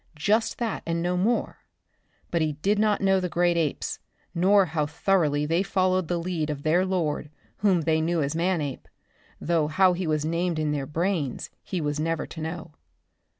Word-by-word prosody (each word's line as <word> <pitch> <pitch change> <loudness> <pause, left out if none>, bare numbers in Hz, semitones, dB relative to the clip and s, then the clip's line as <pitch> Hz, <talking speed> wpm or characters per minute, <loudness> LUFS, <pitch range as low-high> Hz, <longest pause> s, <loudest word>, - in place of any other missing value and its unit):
Just 215 +8 +1
that 230 -3 -2
and 165 0 -1
no 180 +1 0
more; 215 +7 0 0.7
but 170 - +1
he 155 -1 0
did 200 +8 0
not 215 -1 +2
know 195 -1 +3
the 180 -1 -2
great 175 0 +2
apes, 160 -4 -1 0.3
nor 190 +3 +4
how 160 -3 -1
thoroughly 150 -3 +1
they 165 +4 +1
followed 185 -2 +1
the 175 - 0
lead 170 -3 -2
of 145 -2 -4
their 175 +4 +2
lord 160 -5 -1 0.3
whom 190 -4 +2
they 160 0 +1
knew 170 +1 0
as 140 +3 -2
Manape, 165 -6 -1 0.5
though 165 -2 +1
how 185 +4 +4
he 175 -1 -3
was 155 -1 0
named 170 +1 -1
in 155 -1 0
their 140 -2 -2
brains 165 -4 -2
he 185 - -4
was 150 -1 -2
never 165 +1 -1
to 160 - -9
know. 160 0 -6
170 Hz, 185 wpm, -26 LUFS, 155-185 Hz, 0.7 s, nor